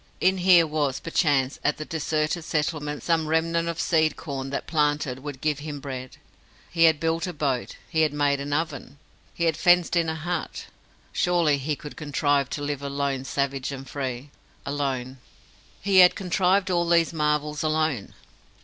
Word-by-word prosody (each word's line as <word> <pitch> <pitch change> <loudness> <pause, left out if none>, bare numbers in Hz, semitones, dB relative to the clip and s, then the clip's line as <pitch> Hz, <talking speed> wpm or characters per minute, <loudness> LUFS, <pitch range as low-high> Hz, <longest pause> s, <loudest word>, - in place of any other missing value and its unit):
In 190 +1 +2
here 175 -2 +6
was, 150 -4 -1
perchance, 145 -5 +1
at 150 - +1
the 155 - -5
deserted 155 +1 -1
settlement 150 -2 -2
some 165 -2 +1
remnant 165 +1 +1
of 170 0 -4
seed 160 -2 +2
corn 135 -3 -5
that, 140 - -3
planted, 150 -4 0
would 135 -1 -8
give 150 -2 0
him 145 -1 -6
bread. 130 -2 -7 0.5
He 165 -1 +4
had 160 -2 +4
built 165 +2 0
a 180 - -4
boat, 140 -5 -2
he 160 - 0
had 155 -2 +3
made 145 -1 +1
an 140 +1 -5
oven, 145 -3 -3 0.3
he 170 - -4
had 165 -2 +2
fenced 175 0 +3
in 165 -2 +2
a 160 - -2
hut. 170 +1 -4 0.5
Surely 170 -5 +2
he 145 +2 -2
could 150 +1 -10
contrive 145 -2 0
to 145 - -4
live 145 -1 -3
alone 140 -1 -2
savage 140 -1 -2
and 135 0 -7
free. 135 0 -5 0.3
Alone! 135 -2 -3 0.6
He 195 -1 +2
had 180 -1 +8
contrived 190 +1 +1
all 170 -1 +1
these 170 -1 +3
marvels 150 -1 0
alone! 155 -7 -1
150 Hz, 170 wpm, -25 LUFS, 140-165 Hz, 0.6 s, had